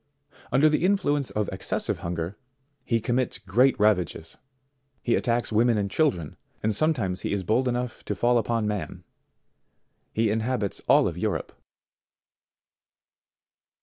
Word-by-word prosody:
Under 135 +5 +5
the 155 +1 +1
influence 145 - +1
of 105 -2 -1
excessive 95 - -2
hunger, 85 +1 -4 0.5
he 115 - +1
commits 120 +2 -1
great 110 +7 +2
ravages. 90 -6 +1 0.7
He 120 - +1
attacks 120 -1 0
women 115 +1 +3
and 100 -1 -1
children, 90 - 0 0.3
and 110 0 +1
sometimes 105 - 0
he - - -3
is 100 -1 -1
bold 115 +8 +1
enough 125 0 -3
to - - -2
fall 120 0 +3
upon 115 -1 -1
man. 105 -2 -4 1.1
He 110 -1 +1
inhabits 110 -2 -1
all - - +4
Europe. - - -2
115 Hz, 125 wpm, -26 LUFS, 100-125 Hz, 1.1 s, Under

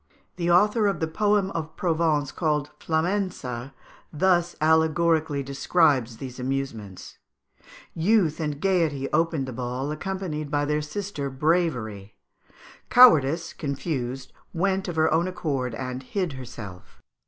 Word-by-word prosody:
The 175 -1 -1
author 210 +5 +4
of 195 -5 -1
the 160 - +1
poem 205 +3 +1
of 160 -3 -5
Provence, 160 -4 +1
called 150 -3 -1
"Flamença," 160 -7 -2 0.4
thus 175 +1 +2
allegorically 160 -1 +2
describes 140 -4 +1
these 130 0 -8
amusements: 125 -7 -5 0.7
"Youth 170 -2 +2
and 150 -3 -3
Gaiety 160 -7 +1
opened 165 -4 +1
the 130 - -5
ball, 125 +4 -3
accompanied 155 -3 -4
by 145 0 0
their 150 +1 0
sister 150 -2 -4
Bravery; 130 - -1 0.7
Cowardice, 165 - +6
confused, 135 -3 -4 0.2
went 190 +2 0
of 175 - -4
her 160 0 +3
own 170 +3 +2
accord 135 -9 -2
and 125 +1 -5
hid 180 +4 -3
herself." 110 -8 -10
155 Hz, 120 wpm, -25 LUFS, 135-175 Hz, 0.7 s, Cowardice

